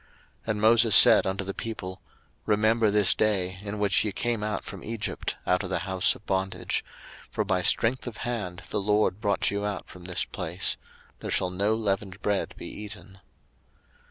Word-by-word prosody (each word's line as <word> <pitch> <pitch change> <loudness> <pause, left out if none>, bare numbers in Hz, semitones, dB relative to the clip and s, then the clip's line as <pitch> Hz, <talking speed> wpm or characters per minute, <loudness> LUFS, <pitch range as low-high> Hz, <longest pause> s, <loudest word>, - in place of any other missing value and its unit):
02:013:003 - - -30 0.4
And 105 -1 -3
Moses 115 0 +5
said - - +8
unto 95 +1 -2
the 95 0 -5
people, 95 -5 -6 0.5
Remember 110 +1 +3
this 100 -2 +3
day, 95 -3 0
in 105 0 -5
which 100 -2 +2
ye 105 - -2
came 120 +2 -2
out 105 -1 -2
from 100 -4 -9
Egypt, 115 -1 -4
out 90 0 +2
of 95 - -5
the 95 - 0
house 95 -2 +2
of 105 - -16
bondage; 95 0 -1 0.5
for 110 - -1
by 95 -2 +1
strength 115 +8 +3
of 120 - -6
hand 100 -6 -4
the 105 - -1
LORD 105 0 +1
brought 100 -1 +1
you 100 0 -2
out 105 -1 -4
from 90 -1 -13
this 90 -1 -1
place: 90 +3 -1 0.4
there - - -6
shall 90 - +1
no 100 +4 +1
leavened 100 -3 -2
bread 100 -1 -1
be - - -8
eaten. 105 -2 -9
100 Hz, 185 wpm, -27 LUFS, 95-110 Hz, 0.5 s, said